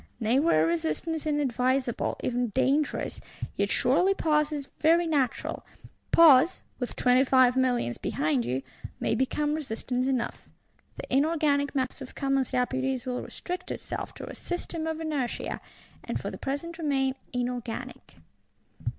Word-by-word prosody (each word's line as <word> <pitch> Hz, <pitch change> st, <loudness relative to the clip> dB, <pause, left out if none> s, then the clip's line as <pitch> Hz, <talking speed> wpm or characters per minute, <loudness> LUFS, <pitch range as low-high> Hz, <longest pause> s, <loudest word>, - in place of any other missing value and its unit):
Nay 235 Hz, +3 st, +2 dB
were 220 Hz, -, +4 dB
resistance 170 Hz, -, -1 dB
unadvisable, 260 Hz, -3 st, 0 dB
even 245 Hz, 0 st, 0 dB
dangerous, 270 Hz, +6 st, 0 dB, 0.3 s
yet -, -, 0 dB
surely 390 Hz, +2 st, +3 dB
pause 300 Hz, -3 st, +2 dB
is 285 Hz, -2 st, -4 dB
very 335 Hz, +2 st, +4 dB
natural: 285 Hz, -6 st, -1 dB, 0.5 s
pause, 325 Hz, +1 st, +6 dB, 0.2 s
with 245 Hz, -, -3 dB
Twenty 250 Hz, +1 st, +4 dB
five 255 Hz, -2 st, +5 dB
Millions 245 Hz, -, +1 dB
behind 145 Hz, -4 st, 0 dB
you, 125 Hz, +3 st, -2 dB, 0.4 s
may -, -, 0 dB
become 295 Hz, +3 st, 0 dB
resistance 255 Hz, -3 st, -2 dB
enough.—The 255 Hz, -1 st, -5 dB
inorganic 285 Hz, -1 st, +2 dB
mass 260 Hz, 0 st, -1 dB
of 260 Hz, -, -9 dB
Commons 275 Hz, -2 st, +1 dB
Deputies 260 Hz, 0 st, -1 dB
will 250 Hz, -1 st, -2 dB
restrict 360 Hz, +1 st, -6 dB
itself -, -, -5 dB
to -, -, -7 dB
a -, -, -7 dB
"system 335 Hz, -2 st, -4 dB
of 320 Hz, 0 st, -2 dB
inertia," 300 Hz, -6 st, -2 dB, 0.4 s
and -, -, -3 dB
for -, -, -4 dB
the -, -, -7 dB
present 325 Hz, +5 st, -4 dB
remain 270 Hz, -4 st, +1 dB, 0.2 s
inorganic. 245 Hz, -2 st, -4 dB
265 Hz, 135 wpm, -28 LUFS, 250-300 Hz, 0.5 s, pause